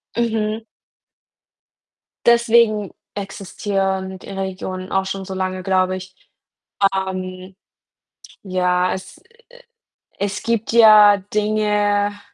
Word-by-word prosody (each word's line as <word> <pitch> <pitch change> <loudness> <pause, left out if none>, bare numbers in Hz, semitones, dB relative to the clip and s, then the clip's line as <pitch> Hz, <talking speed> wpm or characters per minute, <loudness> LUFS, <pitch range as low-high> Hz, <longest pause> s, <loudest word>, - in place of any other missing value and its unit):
Mhm. 220 -2 -1 1.6
Deswegen 235 -3 +4 0.2
existieren 195 -1 -3
die - - -12
Regionen 190 -1 -5
auch 190 0 +1
schon 190 0 -5
so 190 - -6
lange, 185 0 -3
glaube 185 0 +1
ich. 185 0 -11 0.8
Ähm, 185 -1 -5 0.9
ja, 180 -1 +1
es 190 0 -9 1.0
es 200 0 -2
gibt 230 -1 -1
ja 215 -3 +7 0.2
Dinge 210 -1 +1
195 Hz, 90 wpm, -20 LUFS, 185-210 Hz, 1.6 s, ja